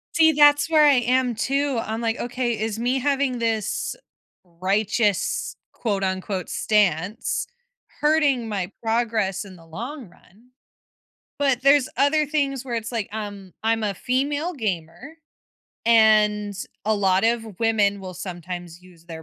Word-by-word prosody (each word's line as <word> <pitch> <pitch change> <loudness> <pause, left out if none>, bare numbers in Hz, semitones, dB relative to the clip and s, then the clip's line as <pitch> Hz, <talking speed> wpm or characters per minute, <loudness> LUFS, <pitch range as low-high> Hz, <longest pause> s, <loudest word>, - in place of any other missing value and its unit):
See, 320 -1 +5
that's 290 +1 +5
where 310 -2 +5
I 290 -2 +6
am 250 0 +1
too, 275 +2 0
I'm 220 +1 -4
like, 230 0 -1
okay, 245 -1 -2
is 220 0 -2
me 250 +3 0
having 275 -2 0
this 225 -2 -1 0.5
righteous, 195 +4 0 0.2
quote 200 -4 -2
unquote 190 0 -3
"stance" 200 - 0 0.5
hurting 290 -6 +2
my 190 -4 -3
progress 220 -4 0
in 190 -2 -12
the 165 -2 -17
long 235 - -7
run? 215 +8 -24 0.9
But 270 -4 +2
there's 275 0 +4
other 305 +2 +3
things 280 -3 -1
where 245 -3 -4
it's 230 0 -4
like, 225 -4 -3
um, 205 -3 -7
I'm 225 0 +1
a 205 -1 0
female 285 - -1
gamer, 210 - -5 0.7
and 215 -2 +4 0.3
a 220 +1 +2
lot 195 -1 +2
of 225 -4 -1
women 215 -3 +2
will 185 -1 -8
sometimes 175 -1 -7
use 175 -2 -19
their 165 -2 -8
225 Hz, 140 wpm, -23 LUFS, 195-260 Hz, 0.9 s, I